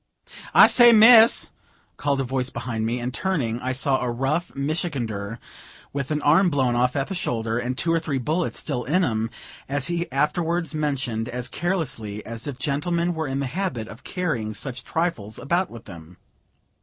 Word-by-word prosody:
"I - - +10
say, 240 -1 +7
Mrs.!" 225 +1 +7 0.5
called 140 -1 0
a - - +1
voice 130 0 -1
behind 115 -2 -3
me; 120 +2 -2
and, 120 +1 -4
turning, 130 -12 -1
I 130 - -2
saw 130 +1 +1
a 125 - -1
rough 135 +8 -1
Michigander, 130 - -3 0.6
with 140 -1 -3
an 150 -1 -2
arm 180 +6 +5
blown 130 -5 +1
off 125 +1 +1
at 135 -1 0
the 195 - -6
shoulder, 115 -9 -2
and 125 +1 -3
two 165 +3 +1
or 165 - +2
three 155 -4 -2
bullets 155 +7 -2
still 130 -5 -3
in 180 +8 +1
him 115 -6 -1 0.4
as 140 +1 0
he 170 -3 -3
afterwards 160 +3 0
mentioned, 130 -7 -2
as 125 0 -4
carelessly 125 - -3
as 115 +2 -5
if 140 -3 -5
gentlemen 170 +5 -1
were 160 -2 -3
in 135 +1 -2
the - - -1
habit 130 - -3
of 115 - -12
carrying 135 - -3
such 125 +3 -4
trifles 160 - -2
about 170 +7 0
with 115 -1 -11
them. 85 -2 -12
135 Hz, 180 wpm, -24 LUFS, 120-165 Hz, 0.6 s, I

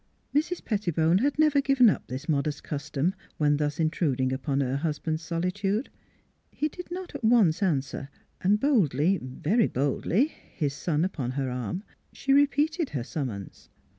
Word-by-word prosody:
Mrs. 315 +5 0
Pettibone 175 -5 +2
had 285 +5 +1
never 300 -2 +4
given 275 -3 +5
up 210 - +1
this 130 +4 -6
modest 145 -1 0
custom, 150 +3 -2 0.2
when 145 -1 +3
thus 150 0 -1
intruding 140 -5 +1
upon 135 +1 -1
her 135 -1 0
husband's 155 +1 -2
solitude. 195 +7 -1 0.6
He 305 - -2
did 360 +3 -9
not 365 +1 -6
at - - -7
once 220 -8 +4
answer; 140 -6 -1 0.3
and 205 +3 +3
boldly 190 - +2
very 160 - +1
boldly 145 - +1 0.3
his 145 -5 -1
son 155 +2 0
upon 135 -9 -3
her 135 -1 -2
arm, 125 - -3 0.3
she 275 - +1
repeated 290 +3 +2
her 130 -5 -3
summons. 120 - -6
165 Hz, 150 wpm, -27 LUFS, 140-230 Hz, 0.6 s, given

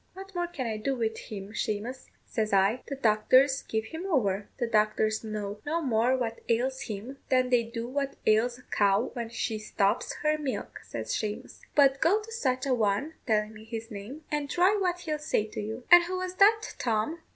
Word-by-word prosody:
'What 390 +1 -10
more 350 -1 -1
can 285 -7 -5
I 220 -2 -2
do 265 +6 -1
with 225 -2 -1
him, 200 -2 -7
Shamous?' 230 +4 -3 0.2
says 215 -3 -2
I; 195 +5 +3
'the 275 - -4
doctors 260 +3 +4
give 220 0 -2
him 325 +10 -6
over.' 205 - +1
'The 245 - 0
doctors 215 -1 +1
know 210 -1 -4
no 320 +3 -1
more 250 -3 +2
what 230 -2 -3
ails 260 +3 +1
him 230 +6 -6
than 255 -1 +3
they 245 -1 +5
do 230 0 -5
what 275 +1 -2
ails 225 +3 +3
a 250 - -17
cow 205 +3 +2
when 235 -3 -4
she 225 -1 -2
stops 200 -1 0
her 305 0 +2
milk,' 280 -4 -4
says - - -5
Shamous; 215 +3 -4 0.2
'but 275 -2 +5
go 370 +7 +4
to 435 +1 -11
such 260 - -1
a 270 - +2
one,' 230 +6 +1
telling 215 -1 +1
me 215 0 -12
his 225 +1 -7
name, 215 +10 -8
'and 295 -1 -1
try 365 +6 +4
what 360 -3 0
he'll 305 -3 -2
say 255 -7 0
to 215 - -6
you.'" 220 +4 -5
"And 350 0 +9
who 370 +1 -3
was 370 0 -3
that, 435 +2 +5
Tom?" 230 +8 0
245 Hz, 205 wpm, -28 LUFS, 215-295 Hz, 0.2 s, And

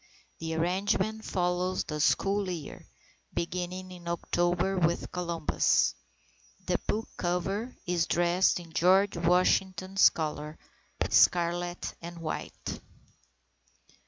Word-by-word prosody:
The 160 0 -3
arrangement 200 +6 0
follows 180 0 0
the 150 -1 -5
school 195 +5 +2
year, 165 -5 -7 0.5
beginning 180 +2 -3
in 175 -1 -11
October 175 +2 0
with 170 -2 0
Columbus. 170 -3 +1 0.7
The - - +1
book 220 +2 -1
cover 195 +7 -2
is 175 -2 +1
dressed 175 +2 +2
in 165 -2 -12
George 190 +4 +4
Washington's 185 +2 +3
colours, 150 -1 -4 0.5
scarlet 175 0 +2
and 170 0 -8
white. 165 -2 -5
175 Hz, 100 wpm, -29 LUFS, 170-185 Hz, 0.7 s, George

